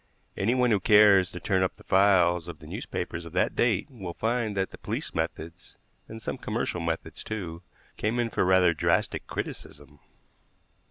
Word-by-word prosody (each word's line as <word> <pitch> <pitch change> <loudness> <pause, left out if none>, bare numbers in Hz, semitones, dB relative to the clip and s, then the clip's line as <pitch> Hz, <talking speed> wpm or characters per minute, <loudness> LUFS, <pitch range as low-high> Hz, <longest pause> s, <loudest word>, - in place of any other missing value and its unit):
Anyone 125 +4 +2
who 105 - +3
cares 100 -2 +6
to 90 - -7
turn 95 +1 +1
up 95 - 0
the - - -18
files 90 -3 +3
of 85 -3 -7
the 75 - -15
newspapers 85 +2 -5
of 85 - -11
that - - +1
date 120 -2 +1
will 95 -9 -7
find 115 -2 -1
that 95 0 -1
the - - -12
police - - -4
methods, 80 +1 -5 0.3
and 110 - -9
some - - -5
commercial 90 - -2
methods, 85 0 -4
too, 90 -6 -5 0.4
came 110 +3 -1
in 120 -1 0
for - - +1
rather 90 -2 +4
drastic 75 - 0
criticism. 75 0 -7
95 Hz, 170 wpm, -27 LUFS, 85-105 Hz, 0.4 s, cares